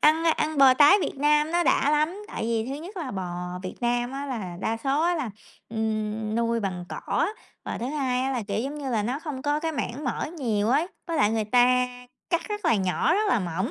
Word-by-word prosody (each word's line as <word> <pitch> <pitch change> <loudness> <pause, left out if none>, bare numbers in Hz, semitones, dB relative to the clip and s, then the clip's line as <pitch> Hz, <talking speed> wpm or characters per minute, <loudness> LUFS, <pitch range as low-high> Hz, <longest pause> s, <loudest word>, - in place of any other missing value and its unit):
Ăn 315 +2 +4
ăn 310 -2 +1
bò 265 -2 +8
tái 295 +7 +7
Việt - - -3
Nam 300 +2 +3
nó 345 0 +3
đã 285 -2 +3
lắm. 310 +7 +1
Tại - - -5
vì 225 0 0
thứ 270 - -3
nhất 390 +4 -9
là 315 -8 -4
bò 180 -1 -4
Việt 185 - -5
Nam 240 +1 0
á 275 +1 -4
là 210 -10 -4
đa 225 +2 -1
số 270 +6 0
á 350 +1 +2
là, 300 -9 -2 0.4
ừm, 215 -1 -2
nuôi 230 0 +1
bằng 185 -3 -3
cỏ, - - -1 0.4
và - - -4
thứ 235 - -3
hai 265 -3 0
á 265 - 0
là, 245 -3 -1
kiểu, 205 - 0
giống 275 +5 -3
như 275 -3 -4
là 220 -4 +1
nó 250 +6 -2
không 295 -4 -6
có 295 +1 +1
cái 325 0 -2
mảng 285 -1 -4
mỡ - - -1
nhiều 215 -6 0
ấy, 290 +8 +2 0.2
với 335 -2 -2
lại 210 -7 +4
người 220 -1 0
ta 250 +2 +4 0.4
cắt 340 -1 0
rất 420 0 -4
là - - +4
nhỏ, 190 - +1
rất 420 +2 +1
là 250 - +3
mỏng, 185 - -2
255 Hz, 240 wpm, -26 LUFS, 220-300 Hz, 0.4 s, bò